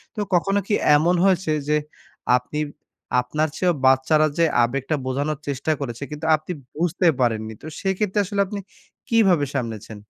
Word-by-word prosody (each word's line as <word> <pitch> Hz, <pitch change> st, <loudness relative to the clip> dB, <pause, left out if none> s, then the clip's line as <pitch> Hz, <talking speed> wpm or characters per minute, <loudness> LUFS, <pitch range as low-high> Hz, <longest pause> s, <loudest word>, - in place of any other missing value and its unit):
তো -, -, -5 dB
কখনো 195 Hz, +3 st, +2 dB
কি -, -, 0 dB, 0.2 s
এমন 170 Hz, +4 st, +3 dB
হয়েছে, 185 Hz, -4 st, +2 dB, 0.2 s
যে 150 Hz, -, +2 dB, 0.6 s
আপনি 125 Hz, +5 st, -5 dB, 0.6 s
আপনার 150 Hz, +5 st, -1 dB
চেয়েও 180 Hz, -1 st, +2 dB
বাচ্চারা 135 Hz, +4 st, +4 dB
যে 170 Hz, -, +4 dB, 0.2 s
আবেগটা 135 Hz, +5 st, -1 dB
বোঝানোর 140 Hz, +3 st, -1 dB
চেষ্টা 140 Hz, +2 st, -1 dB
করেছে, 125 Hz, -1 st, -5 dB
কিন্তু 150 Hz, +1 st, -6 dB
আপনি 155 Hz, +3 st, -7 dB, 0.2 s
বুঝতে 175 Hz, +2 st, +1 dB
পারেননি? 110 Hz, -3 st, 0 dB
তো -, -, -12 dB, 0.2 s
সেইক্ষেত্রে 195 Hz, +1 st, 0 dB
আসলে 200 Hz, +1 st, -1 dB
আপনি 200 Hz, +1 st, -5 dB, 0.5 s
কিভাবে 195 Hz, -10 st, +3 dB
সামলেছেন? 110 Hz, -3 st, -4 dB
155 Hz, 150 wpm, -22 LUFS, 130-180 Hz, 0.6 s, বাচ্চারা